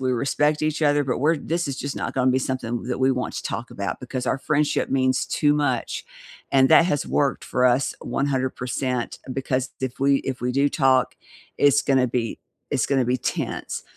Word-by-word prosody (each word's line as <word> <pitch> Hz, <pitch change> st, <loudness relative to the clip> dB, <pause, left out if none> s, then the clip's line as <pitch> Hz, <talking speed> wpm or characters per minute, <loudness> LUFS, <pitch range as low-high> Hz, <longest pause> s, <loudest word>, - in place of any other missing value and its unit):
we 130 Hz, -1 st, 0 dB
respect 150 Hz, +5 st, +1 dB
each 155 Hz, 0 st, 0 dB
other, 145 Hz, -1 st, +3 dB
but 130 Hz, -2 st, -1 dB
we're 155 Hz, +4 st, +2 dB
this 165 Hz, +2 st, -2 dB
is 135 Hz, -, -4 dB
just 140 Hz, 0 st, -4 dB
not -, -, -4 dB
gonna 130 Hz, -1 st, +3 dB
be 130 Hz, -, +2 dB
something 130 Hz, -3 st, -3 dB
that 125 Hz, 0 st, -3 dB
we 130 Hz, +1 st, +3 dB
want 125 Hz, -1 st, -2 dB
to -, -, -4 dB
talk 115 Hz, -, -4 dB
about 100 Hz, 0 st, -4 dB
because 125 Hz, 0 st, -4 dB
our 130 Hz, -, 0 dB
friendship 150 Hz, +1 st, 0 dB
means 130 Hz, -1 st, +1 dB
too 145 Hz, -1 st, +2 dB
much, 145 Hz, -5 st, -1 dB, 0.4 s
and 135 Hz, -1 st, +4 dB
that 170 Hz, -, +7 dB
has 145 Hz, -4 st, 0 dB
worked 140 Hz, -3 st, 0 dB
for 125 Hz, 0 st, +2 dB
us 125 Hz, +2 st, +2 dB
100% 130 Hz, -2 st, -2 dB
because, 130 Hz, 0 st, -1 dB
if 130 Hz, -1 st, -4 dB
we 140 Hz, 0 st, +4 dB
if 130 Hz, -2 st, -4 dB
we 125 Hz, 0 st, -1 dB
do 140 Hz, +2 st, +2 dB
talk, 130 Hz, -3 st, +2 dB, 0.4 s
it's 145 Hz, 0 st, +4 dB
gonna 130 Hz, -2 st, +3 dB
be 115 Hz, -1 st, -2 dB, 0.3 s
it's 135 Hz, -5 st, +1 dB
gonna 135 Hz, -2 st, +2 dB
be 125 Hz, +1 st, 0 dB
tense, -, -, -3 dB
130 Hz, 200 wpm, -23 LUFS, 125-140 Hz, 0.4 s, that